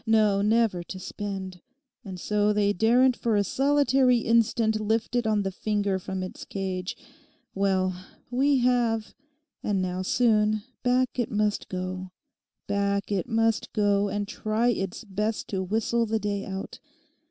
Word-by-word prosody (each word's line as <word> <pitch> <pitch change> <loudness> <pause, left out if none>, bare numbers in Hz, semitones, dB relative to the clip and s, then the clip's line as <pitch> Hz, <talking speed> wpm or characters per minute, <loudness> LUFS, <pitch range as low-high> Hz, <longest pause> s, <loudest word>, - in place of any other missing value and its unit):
No, 215 -3 +4
never 215 -3 +2
to 180 +2 -8
spend, 190 -1 -6 0.4
and 190 -3 -7
so 210 +2 +1
they 205 -1 +2
daren't 245 +5 +4
for 230 -2 0
a 205 - +3
solitary 270 0 +3
instant 230 -1 +2
lift 220 +3 -1
it 240 -2 +1
on 210 -2 +2
the 195 - -2
finger 205 -1 -1
from 190 0 -4
its 185 - -7
cage. 185 -1 -4 0.6
Well, 185 -2 0 0.3
we 275 +3 +3
have; 235 -3 +1 0.5
and 200 -2 0
now, 185 0 -2
soon, 215 0 +2 0.2
back 255 0 +1
it 240 - 0
must 210 0 -1
go, 185 0 -4 0.6
back 200 0 -1
it 190 -4 -1
must 225 0 +1
go, 205 -1 +2
and 205 +1 -2
try 220 +4 0
its 195 -2 -2
best 210 +1 -2
to 190 -2 -1
whistle 225 +4 0
the 220 +1 0
day 205 -1 -2
out. 190 0 -6
210 Hz, 150 wpm, -26 LUFS, 195-225 Hz, 0.6 s, No